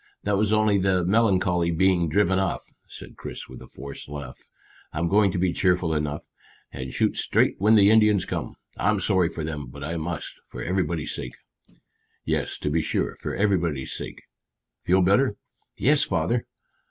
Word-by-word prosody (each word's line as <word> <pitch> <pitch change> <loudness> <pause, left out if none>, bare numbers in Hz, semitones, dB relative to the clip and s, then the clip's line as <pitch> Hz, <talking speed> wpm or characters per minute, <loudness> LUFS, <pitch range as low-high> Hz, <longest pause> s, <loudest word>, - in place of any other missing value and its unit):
That 105 0 +1
was 105 +1 +1
only 110 -2 +3
the 95 -2 +1
melancholy 95 -4 +2
being 85 0 +2
driven 95 +2 +2
off," 95 - -1 0.2
said - - -11
Chris - - -7
with - - -11
a 65 - -11
forced 70 +2 -9
laugh. 70 -3 -7 0.5
"I'm 85 +2 -1
going 100 +2 +4
to 90 - -3
be 90 0 +1
cheerful 90 -3 +1
enough, 75 -1 -2 0.5
and 65 -1 -6
shoot - - 0
straight - - +2
when 105 +3 +5
the 100 -1 +6
Indians 105 -3 +4
come. - - -4 0.2
I'm 105 +1 +1
sorry 95 -3 +2
for 80 - -5
them, 75 -3 -4
but 70 +3 -10
I 85 +3 -3
must, 80 -1 -5
for - - -7
everybody's 85 -4 -1
sake." 60 - -6 0.9
"Yes, - - -1
to 75 - -1
be 80 +2 +2
sure, - - -1
for - - -4
everybody's 85 -9 0
sake. - - -7 0.6
Feel 95 +1 +3
better?" 100 +5 +3 0.4
"Yes, 145 +2 +4
father." 95 +7 0
90 Hz, 170 wpm, -25 LUFS, 80-100 Hz, 0.9 s, the